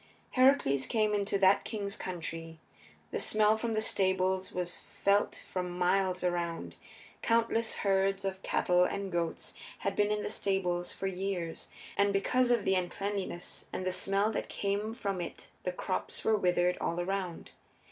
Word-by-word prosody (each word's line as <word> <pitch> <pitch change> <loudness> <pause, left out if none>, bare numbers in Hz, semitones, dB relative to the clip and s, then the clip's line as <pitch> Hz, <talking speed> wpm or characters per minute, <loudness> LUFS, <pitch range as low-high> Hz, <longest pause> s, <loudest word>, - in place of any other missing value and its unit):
Heracles 255 - +4
came 215 -2 +2
into 200 -1 +1
that 195 0 +5
king's 200 -3 -3
country. 165 -2 -5 0.5
The - - -1
smell 215 0 +3
from 225 0 -2
the 215 - +1
stables 190 -1 +1
was 180 -1 -3 0.2
felt 200 +1 +3
for 185 - -2
miles 180 +1 +1
around. 175 -2 -1 0.5
Countless 230 0 +2
herds 195 0 +1
of 190 0 -3
cattle 180 0 +3
and 195 +1 -2
goats 170 -1 -2 0.3
had - - -1
been 205 0 +3
in 210 0 0
the - - -2
stables 180 -4 0
for 195 - -5
years, 185 -3 -3 0.3
and 200 0 +3
because 245 +6 +2
of 235 -4 +2
the 190 - +3
uncleanness 190 0 -3
and 185 - -3
the 185 - +1
smell 195 +3 +1
that - - -3
came 205 +3 -1
from 200 -6 -2
it - - -7 0.2
the 180 - +1
crops 185 +1 -3
were 220 - +4
withered 180 -2 +2
all 170 - -1
around. 185 -1 -3
195 Hz, 155 wpm, -31 LUFS, 180-205 Hz, 0.5 s, that